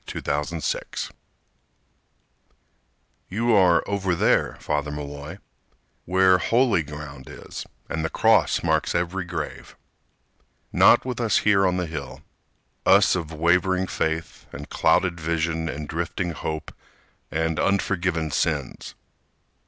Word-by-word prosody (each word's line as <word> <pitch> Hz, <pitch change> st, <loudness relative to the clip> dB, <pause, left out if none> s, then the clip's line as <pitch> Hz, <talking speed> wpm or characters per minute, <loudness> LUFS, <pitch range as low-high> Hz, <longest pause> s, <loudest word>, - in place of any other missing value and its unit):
Father 75 Hz, +4 st, -2 dB
Malloy 80 Hz, -, -3 dB, 2.2 s
You 115 Hz, +5 st, +1 dB
are 90 Hz, -5 st, +5 dB
over 95 Hz, -3 st, 0 dB
there, -, -, +2 dB
Father 75 Hz, -1 st, -2 dB
Malloy, 75 Hz, +3 st, -7 dB, 0.7 s
Where 95 Hz, 0 st, +4 dB
holy 120 Hz, -5 st, +2 dB
ground 75 Hz, -3 st, -9 dB
is, -, -, -9 dB, 0.2 s
and 80 Hz, 0 st, -3 dB
the 80 Hz, -, -1 dB
cross -, -, +3 dB
marks -, -, +1 dB
every 90 Hz, +1 st, -1 dB
grave, 85 Hz, -1 st, -6 dB, 1.0 s
Not -, -, +6 dB
here -, -, -9 dB
with 125 Hz, -, -3 dB
us 110 Hz, -3 st, +1 dB
on 95 Hz, -3 st, +3 dB
the 90 Hz, -, -1 dB
hill— 80 Hz, 0 st, -7 dB, 0.6 s
Us -, -, +5 dB
of 85 Hz, -3 st, -4 dB
wavering 90 Hz, +4 st, +2 dB
faith, 80 Hz, -2 st, -3 dB
and -, -, -8 dB
clouded 90 Hz, -2 st, +2 dB
vision 80 Hz, 0 st, -1 dB
And 75 Hz, 0 st, -5 dB
drifting 85 Hz, +2 st, -3 dB
hope, 80 Hz, -1 st, -5 dB, 0.6 s
and 80 Hz, 0 st, -1 dB
unforgiven 90 Hz, -5 st, 0 dB
sins. -, -, -2 dB
85 Hz, 115 wpm, -24 LUFS, 80-95 Hz, 2.2 s, Not